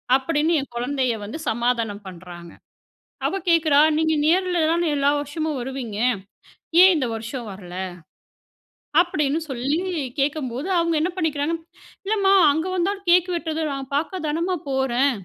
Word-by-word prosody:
அப்பிடின்னு 310 +4 +1
என் 270 - -9
குழந்தைய 250 0 0
வந்து 215 +10 -6
சமாதானம் 230 -3 -1
பண்றாங்க. 175 -1 -10 0.8
அவ - - -2
கேட்குறா, 315 -4 +4 0.2
நீங்க 315 0 +2
நேர்ல 360 +2 +2
தான 340 0 +1
எல்லா 280 0 +2
வருஷமும் 295 0 -3
வருவீங்க. 245 -4 -5 0.9
ஏன் 375 0 +8
இந்த 265 -4 0
வருஷம் 230 +2 -6
வரல? 180 -2 -10 1.2
அப்பிடின்னு 305 -3 0
சொல்லி 270 +5 -1 0.4
கேட்கும்போது, 275 +1 -1
அவுங்க 335 0 +1
என்ன 350 +4 +1
பண்ணிக்கிறாங்க. 320 -2 0 0.5
இல்லம்மா! 395 -2 +2 0.2
அங்க 320 +4 -1
வந்தாலும் 390 +2 -1
கேக் 360 +1 +5
வெட்டுறது 320 -1 -2
நான் 275 0 -6
பாக்க 355 +5 -2
தானம்மா 340 +4 -1
போறேன். 265 +1 +2
290 Hz, 130 wpm, -23 LUFS, 250-335 Hz, 1.2 s, ஏன்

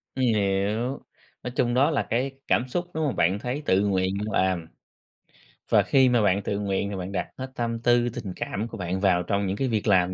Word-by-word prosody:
Ừm, 130 - -1
hiểu. 105 +3 0 0.4
Nói 125 - -4
chung 120 -2 +1
đó 140 +6 +3
là 145 - -1
cái 125 +4 0 0.2
cảm 125 - +2
xúc 175 +8 -2
đúng 160 0 -1
không? 140 - -2
Bạn 90 +4 +2
thấy 125 +6 -3
tự 95 +1 +3
nguyện 95 -1 0
bạn 105 +1 -3
làm 90 -3 -1 1.0
và - - +5
khi 130 -2 +4
mà 120 -2 +3
bạn 100 -1 +2
tự 100 - -2
nguyện 100 0 -1
thì 100 - -4
bạn 95 0 -5
đặt 90 -3 -2
hết 130 0 -6
tâm 115 -1 -2
tư 120 0 +3
tình 100 -5 -6
cảm 110 +3 -3
của 115 - -8
bạn 90 0 -2
vào 95 -2 +3
trong 100 +2 -1
những 95 +2 -2
cái 135 - 0
việc 110 -4 -1
làm 95 -3 +3
105 Hz, 230 wpm, -25 LUFS, 95-125 Hz, 1.0 s, và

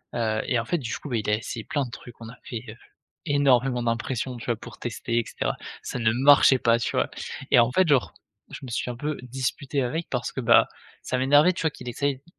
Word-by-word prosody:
Heu 110 -2 0
et 125 - +1
en 115 - -3
fait, 175 - 0
du 115 -5 -4
coup, 145 - -9
bah, 120 - 0
il 105 -1 -2
a 105 - +4
essayé 115 +1 -6
plein 145 -4 -1
de - - -9
trucs. 120 0 -11
On 115 - -8
a 125 - -11
fait, 115 -3 -6
heu, 110 - -9 0.5
énormément 135 -4 +3
d'impression, 120 +2 -2
tu 115 - -9
vois? 120 - +1
Pour 115 -1 -11
tester 115 0 -3
et 115 - -2
cetera. - - -2 0.3
Ça - - -4
ne 110 -1 +3
marchait 135 0 +6
pas, 115 0 +3
tu 115 - -2
vois? - - +1 0.4
Et - - +6
en 115 +1 +4
fait, 185 +3 +3
genre, 140 -4 +2 0.4
je - - -7
me 130 - -7
suis 120 +1 -2
un 120 - -9
peu 150 +2 -3
disputé 135 +2 -2
avec, 160 +7 -3
parce 125 -1 -2
que, 130 - -3
bah, 120 -1 +5 0.4
ça 130 - -1
m'énervait, 145 +7 +5
tu - - -5
vois? 160 - +1
Qu'il 125 - -8
essaye 140 +3 -1
d 135 - -27
125 Hz, 250 wpm, -25 LUFS, 115-140 Hz, 0.5 s, marchait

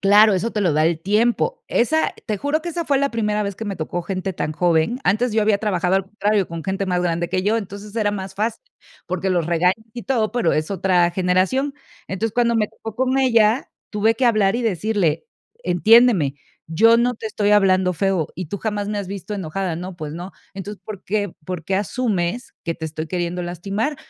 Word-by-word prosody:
Claro, 205 +2 +6
eso 215 +5 -1
te 210 - -2
lo 175 -5 +2
da 155 +1 +3
el 165 -1 +1
tiempo, 235 - +1
esa 315 +7 +1
te 210 -3 -2
juro 300 +2 0
que 345 - -4
esa 335 0 -3
fue 280 - +3
la 280 0 +1
primera 210 -2 0
vez 200 -1 -3
que 225 - -6
me 195 - -3
tocó 165 +2 -3
gente 190 +1 -3
tan 155 - -3
joven, 170 +8 +1
antes 225 +5 +2
yo 220 -1 +2
había 210 -1 +3
trabajado, 190 -3 +1
al 195 - +1
contrario 205 -1 0
con 165 -2 -6
gente 195 0 -2
más 180 -1 0
grande 170 0 0
que 185 - 0
yo, 215 +3 +2
entonces 200 +1 -8
era 210 -2 +2
más 190 -1 -5
fácil, 225 - -2 0.4
porque 185 +1 -2
los 175 -3 +1
regañas 175 +2 +3 0.2
y 240 - -7
todo, 230 -5 0
pero 240 -9 +1
es 155 +4 -1
otra 180 -2 +2
generación, 190 +11 +1 0.3
entonces, 205 +3 -2
cuando 235 -1 +2
me 210 -1 +1
tocó 220 -1 -9
con 260 +1 +1
ella, 230 -2 +3 0.2
tuve 220 +2 +2
que 255 - 0
hablar 215 -2 +3
y 245 - -2
decirle: 195 -6 0 0.4
"Entiéndeme, 185 - +5 0.3
yo 225 +8 +5
no 245 +1 +2
te 220 - -6
estoy 205 -1 0
hablando 185 -3 +4
feo 185 -2 0
y 185 -1 -5
tú 200 - -4
jamás 205 -1 -3
me 210 - -2
has 200 - -4
visto 200 +1 -5
enojada". 185 -1 -3
"No, 180 +1 -7
pues 155 -2 -6
no". 175 +3 -7 0.2
"Entonces, 200 +1 -7
¿por 210 -3 -8
qué 205 -2 -1
por 180 -2 -4
qué 190 - -1
asumes 210 0 -1
que 165 - -1
te 160 - -5
estoy 155 0 -5
queriendo 175 0 -2
lastimar? 195 - -2
200 Hz, 215 wpm, -21 LUFS, 180-225 Hz, 0.4 s, Claro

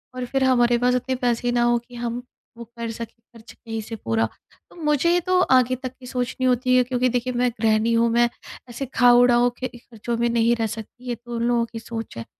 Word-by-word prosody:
और 255 - -3
फिर 270 +2 -1
हमारे 240 -2 +3
पास 250 +1 +2
इतने 255 +1 -1
पैसे 245 -1 0
ना 240 0 +2
हो 240 0 +3
कि 240 +1 -16
हम 240 0 -4 0.4
वो 235 - -7
कर 230 -1 -4
सकें 230 0 -8 0.2
खर्च 230 -1 -14
कहीं 225 -1 -6
से 225 +2 -7
पूरा। 115 - 0 0.4
तो - - -18
मुझे 300 +2 +2
ये 355 - +3
तो 365 +1 +2
आगे 255 -5 +3
तक 255 0 -6
की 250 - -13
सोचनी 250 0 -2
होती 255 0 +2
है 250 - +5
क्योंकि 250 0 0
देखिए 250 +1 -1
मैं 245 0 +1
गृहणी 220 +1 +2
हूँ। 230 0 +3
मैं 240 +1 +3 0.4
ऐसे 240 +3 -5
खाओ 245 -1 +6
उड़ाओ 245 0 +4
के 255 - -2
खर्चों 235 0 -6
में 235 +1 +1
नहीं 235 0 +2
रह 225 -1 -1
सकती। 225 +4 -9
ये 240 - -1
तो 240 +1 -9
उन 230 - -2
लोगों 235 -1 +2
की 225 - -5
सोच 225 - -7
है। 115 - -6
240 Hz, 235 wpm, -23 LUFS, 230-250 Hz, 0.4 s, खाओ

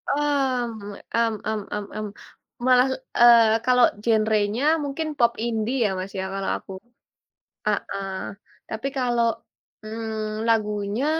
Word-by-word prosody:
Mmm, 250 -8 -1 0.2
mmm 230 -1 +2
mmm 220 0 -1
mmm 210 0 -3
mmm. 215 0 -3 0.6
Malah, 255 0 +6 0.3
eee, 230 -2 +7
kalau 250 -1 +5 0.2
genre-nya 220 +1 +2 0.2
mungkin 285 +3 -3
pop 235 -2 +4
indie 230 +2 -1
ya - - +2
Mas 190 +1 -5
ya - - -1
kalau 195 0 -2
aku. - - -13 1.0
Heeh. 200 -1 -1 0.6
Tapi 220 +4 -3
kalau, 240 -2 +1 0.6
mmm, 220 0 -4
lagunya 210 +1 0
225 Hz, 120 wpm, -24 LUFS, 215-245 Hz, 1.0 s, eee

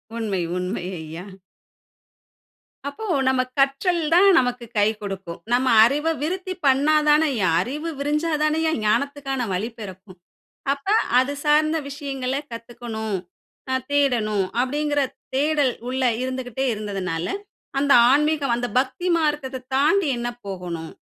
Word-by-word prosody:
உண்மை. 210 -5 -2 0.2
உண்மை 180 +1 -3 0.2
ஐயா. 160 +3 -8 1.6
அப்போ 440 +10 -6 0.2
நம்ம 260 -1 +3 0.2
கற்றல் 275 +6 +2
தான் 365 +4 +6
நமக்கு 245 -1 -2
கை 205 0 +4
குடுக்கும். 195 -4 -6
நம்ம 255 +2 +2 0.2
அறிவ 290 +7 +2
விருத்தி 370 +4 -2
பண்ண 275 +2 +4 0.2
தானேய்யா 295 -9 +3
அறிவு 300 - -4
விரிஞ்சா 300 +3 0
தானேயா 315 +1 +1
ஞானத்துக்கான 275 +3 0
வழி 200 +6 -2
பிறக்கும்! 190 -2 -10 0.6
அப்ப, 280 +6 -12 0.3
"அது 260 +3 0
சார்ந்த 305 +2 +3
விஷயங்கள 270 -3 -4 0.2
கத்துக்கணும், 230 -3 -5 0.5
ஆ - - +1 0.2
தேடணும்" 230 -8 +2 0.2
அப்டிங்குற 290 +2 0 0.3
தேடல் 290 -2 +2 0.2
உள்ள 260 +1 -2 0.2
இருந்துக்கிட்டே 255 0 -3
இருந்ததுனால, 190 -5 -3 0.5
அந்த 285 0 +1 0.2
ஆன்மீகம் 295 -2 +2
"அந்த 245 0 -2
பக்திமார்க்கத்த 295 -3 -1
தாண்டி 315 +7 +3
என்ன 240 - -3 0.2
போகணும்? 175 -4 -5
265 Hz, 115 wpm, -23 LUFS, 215-295 Hz, 1.6 s, தான்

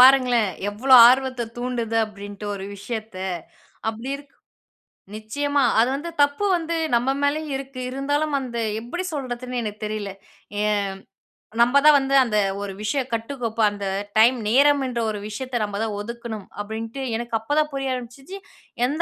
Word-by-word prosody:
பாருங்களேன், 250 -4 +6 0.2
எவ்வளோ 255 +6 +4
ஆர்வத்த 255 -1 +1
தூண்டுது? 240 -2 -2
அப்டின்ட்டு 205 0 -9
ஒரு 195 -1 -6
விஷயத்த. 220 0 -6 0.7
அப்பிடி 225 +4 -4
இருக் 285 0 -17 0.8
நிச்சயமா. 285 +6 0 0.2
அது 235 +3 +4
வந்து 315 +5 -5
தப்பு 285 +8 0
வந்து 335 0 -3 0.2
நம்ம 245 +3 +1
மேலேயும் 295 0 0
இருக்கு. 270 -1 -7
இருந்தாலும், 285 +3 -1
அந்த 250 -3 -5 0.2
எப்பிடி 345 +11 -4
சொல்றதுன்னு 250 -3 -3
எனக்கு 210 -1 -6
தெரியல. 210 -2 -3 0.5
ஏ - - +1 1.0
நம்ம 245 +4 +5
தான் 305 -1 +9
வந்து 275 0 +1
அந்த 215 -4 0 0.2
ஒரு 200 -1 -4
விஷயம் 255 +4 -1
கட்டுக்கோப்பு 230 -1 -2
அந்த 205 -1 -6 0.3
டைம், 235 +4 +6
நேரம் 280 +5 +5
என்ற 240 -2 -3
ஒரு 210 - -3
விஷயத்த, 255 +4 -5
நம்ம 205 -1 -3
தான் 220 -2 -2
ஒதுக்கணும் 230 -1 -6 0.2
அப்டின்ட்டு 225 +5 -5
எனக்கு 235 0 -5
அப்போ 225 +6 -3
தான் 300 - +1
புரிய 270 -1 -2
ஆரம்பிச்சிச்சு. 260 +9 -7 0.5
எந்த 295 +6 -1
245 Hz, 150 wpm, -23 LUFS, 220-275 Hz, 1.0 s, தான்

